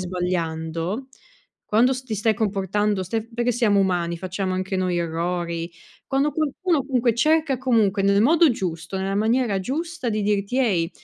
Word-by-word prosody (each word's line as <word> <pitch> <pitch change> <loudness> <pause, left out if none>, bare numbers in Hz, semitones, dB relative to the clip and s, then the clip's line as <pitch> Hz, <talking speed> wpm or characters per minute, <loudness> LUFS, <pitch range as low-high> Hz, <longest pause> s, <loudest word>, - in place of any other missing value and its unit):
sbagliando, 175 +3 -3 0.6
quando 235 +5 +3
s 260 0 -3
ti 220 -3 -3
stai 220 +2 +2
comportando, 205 -1 0
stai 225 +4 -3
perché 240 +1 +1
siamo 215 -4 +2
umani, 175 -3 0
facciamo 185 +1 -3
anche 185 +1 -2
noi 185 -1 0
errori, 170 0 -2 0.4
quando 275 +2 +1
qualcuno 310 -1 0
comunque 250 -3 +1
cerca 305 +3 +2
comunque 225 -6 +2
nel 200 +1 +3
modo 320 +6 +5
giusto, 180 -5 -3
nella 190 +1 -2
maniera 220 -1 +1
giusta 310 - -4
di 215 -1 -1
dirti: 205 +3 0
"Ehi, 190 -11 +2
205 Hz, 150 wpm, -23 LUFS, 185-250 Hz, 0.6 s, modo